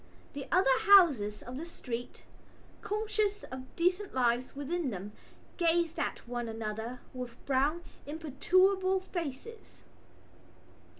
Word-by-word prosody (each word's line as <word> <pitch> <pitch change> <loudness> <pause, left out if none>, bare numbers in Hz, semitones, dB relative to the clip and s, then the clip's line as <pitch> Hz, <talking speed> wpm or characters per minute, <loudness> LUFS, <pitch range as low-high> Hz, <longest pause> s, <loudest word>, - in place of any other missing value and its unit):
The 280 -1 -6
other 270 -8 +4
houses 285 - +6
of 250 +1 -7
the 305 - -4
street, 245 -7 -6 0.6
conscious 420 -1 -1
of 260 0 -9
decent 360 +2 0
lives 245 0 +1
within 295 +2 -2
them, 200 -1 -6 0.5
gazed 335 -1 +2
at - - -3
one 240 -1 -3
another 225 +2 -5
with 250 -2 -6
brown 285 +5 +1 0.2
imperturbable 370 +6 +2
faces. 360 - -7
285 Hz, 110 wpm, -31 LUFS, 245-370 Hz, 0.6 s, houses